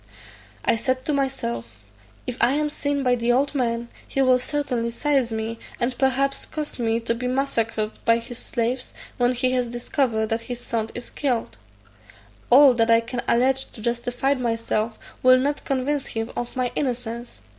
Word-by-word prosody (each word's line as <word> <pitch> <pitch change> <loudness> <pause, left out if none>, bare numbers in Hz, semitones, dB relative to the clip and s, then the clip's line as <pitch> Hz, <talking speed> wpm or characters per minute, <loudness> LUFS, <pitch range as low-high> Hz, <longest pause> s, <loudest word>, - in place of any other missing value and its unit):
I - - +4
said 255 +2 -1
to 300 - +1
myself, 120 - -2 0.5
"If 250 - -3
I 255 - +5
am 300 +1 0
seen 285 -1 -1
by 250 -1 +3
the 240 0 +1
old 275 +4 +2
man, 235 -3 -1 0.2
he - - -3
will 255 -1 +5
certainly 250 -4 -1
seize 265 0 +1
me, 225 +1 -3 0.2
and 245 +1 0
perhaps 270 +1 +1
cause 300 -4 -5
me 230 -1 +1
to 230 0 0
be 250 +2 -3
massacred 230 -5 0
by 230 0 +4
his 235 +1 -8
slaves, 250 +1 -2 0.2
when 245 0 +3
he 255 +1 +1
has 250 -1 +1
discovered 240 -2 0
that 225 +1 0
his 245 +1 -6
son 225 -2 -2
is 245 - -6
killed: 250 - -2 0.9
all 270 +1 +8
that 230 -1 +2
I 230 0 +6
can 240 +1 -3
allege 260 +3 +3
to 220 - -10
justify 245 +3 0
myself 230 -3 -1 0.2
will 255 0 +7
not 285 +3 -1
convince 275 +1 0
him 225 +1 -3
of 240 0 -4
my 255 -1 0
innocence. 240 -3 -3
245 Hz, 175 wpm, -24 LUFS, 230-265 Hz, 0.9 s, all